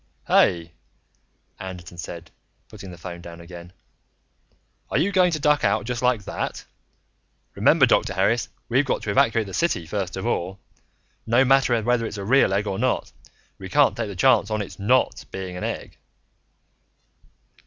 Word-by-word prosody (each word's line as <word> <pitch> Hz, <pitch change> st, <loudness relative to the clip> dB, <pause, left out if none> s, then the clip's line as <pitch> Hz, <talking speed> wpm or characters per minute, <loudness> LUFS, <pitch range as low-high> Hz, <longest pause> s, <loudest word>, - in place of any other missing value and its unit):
"Hey," 85 Hz, -1 st, +3 dB, 0.9 s
Anderton 90 Hz, -2 st, -9 dB
said, 85 Hz, -1 st, -8 dB, 0.4 s
putting 95 Hz, -, -10 dB
the 90 Hz, -, -10 dB
phone 85 Hz, 0 st, -8 dB
down 85 Hz, -1 st, -10 dB
again. 85 Hz, 0 st, -11 dB, 1.2 s
"Are -, -, 0 dB
you 175 Hz, +8 st, +2 dB
going 185 Hz, -2 st, +4 dB
to 155 Hz, -, -1 dB
duck 150 Hz, -1 st, +2 dB
out 100 Hz, 0 st, +1 dB
just 125 Hz, 0 st, -3 dB
like 125 Hz, -4 st, +1 dB
that? -, -, -4 dB, 0.9 s
Remember, -, -, +4 dB
Dr. 100 Hz, -, +1 dB
Harris, 110 Hz, +5 st, +1 dB, 0.2 s
we've 130 Hz, +4 st, +2 dB
got 135 Hz, -, -2 dB
to 105 Hz, -, -2 dB
evacuate 115 Hz, +2 st, +2 dB
the 95 Hz, -, -9 dB
city 170 Hz, -, 0 dB
first 95 Hz, +1 st, -4 dB
of 95 Hz, -, -4 dB
all! 95 Hz, -5 st, -2 dB, 0.7 s
No 120 Hz, +4 st, +4 dB
matter 130 Hz, -3 st, +3 dB
whether 120 Hz, 0 st, +1 dB
it's 105 Hz, -, -7 dB
a 100 Hz, -, -5 dB
real 130 Hz, -2 st, +4 dB
egg 100 Hz, +2 st, 0 dB
or 95 Hz, -2 st, -3 dB
not -, -, 0 dB, 0.5 s
we 95 Hz, -, -8 dB
can't 145 Hz, -2 st, +3 dB
take 115 Hz, -2 st, -3 dB
the 100 Hz, -, -7 dB
chance 115 Hz, 0 st, +3 dB
on 110 Hz, -1 st, -1 dB
it's 100 Hz, -, -12 dB
not 125 Hz, +6 st, +1 dB
being 95 Hz, -1 st, -6 dB
an 90 Hz, -, -6 dB
egg!" -, -, -5 dB
100 Hz, 165 wpm, -23 LUFS, 90-125 Hz, 1.2 s, going